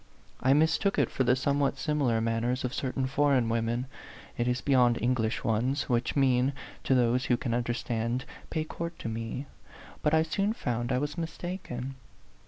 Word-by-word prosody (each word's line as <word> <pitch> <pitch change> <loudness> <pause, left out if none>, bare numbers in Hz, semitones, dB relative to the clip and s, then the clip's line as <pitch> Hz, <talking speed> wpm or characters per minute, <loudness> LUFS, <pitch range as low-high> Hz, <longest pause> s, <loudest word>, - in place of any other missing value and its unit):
I 130 +2 +4
mistook 160 +6 +2
it - - +2
for 130 - +1
the 125 0 +4
somewhat 140 +1 +1
similar 140 -7 +1
man 115 0 0
ners 125 +2 -1
of 125 0 -2
certain 130 -1 -1
foreign 135 -3 +2
women 115 +2 0 0.5
it 120 -1 -1
is 125 0 +1
beyond 125 -4 +3
English 120 -2 0
ones 125 +6 0
which 120 -1 +1
mean, 130 -1 +3 0.3
to 135 - +3
those 125 +1 +2
who 120 - +2
can 120 -1 -2
understand, 120 0 -1
" - - -20
Pay 155 - -1
court 170 +1 -6
to - - -6
me." 115 +4 -4 0.6
But 150 +1 +3
I 160 - +4
soon 195 +6 0
found 120 - -2
I 125 - +2
was 145 +4 -2
mistaken. 155 -6 -5
130 Hz, 180 wpm, -29 LUFS, 120-145 Hz, 0.6 s, I